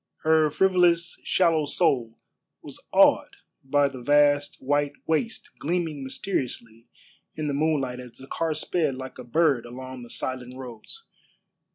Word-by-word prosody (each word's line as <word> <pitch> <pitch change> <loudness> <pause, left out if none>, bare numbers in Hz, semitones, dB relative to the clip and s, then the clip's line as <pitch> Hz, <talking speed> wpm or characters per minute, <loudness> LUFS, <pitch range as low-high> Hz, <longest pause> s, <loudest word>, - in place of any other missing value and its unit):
Her 155 -1 +4
frivolous, 175 0 +2
shallow 165 -4 +2
soul 130 -9 +1 0.5
was - - -10
awed - - +4 0.3
by 140 +1 +3
the 135 -2 -8
vast 145 +1 +3
white 145 +1 0
waste 220 +9 -1
gleaming 160 -3 -2
mysteriously 120 - -4 0.5
in 155 - -3
the 145 - -1
moonlight 140 -4 0
as 125 -2 -10
the 135 - -12
car 160 +3 -2
sped 155 -6 0
like 130 0 -8
a - - -6
bird 140 0 +2
along 130 +1 -8
the 120 - -11
silent 125 0 -4
roads. 130 - -9
145 Hz, 140 wpm, -25 LUFS, 130-160 Hz, 0.5 s, Her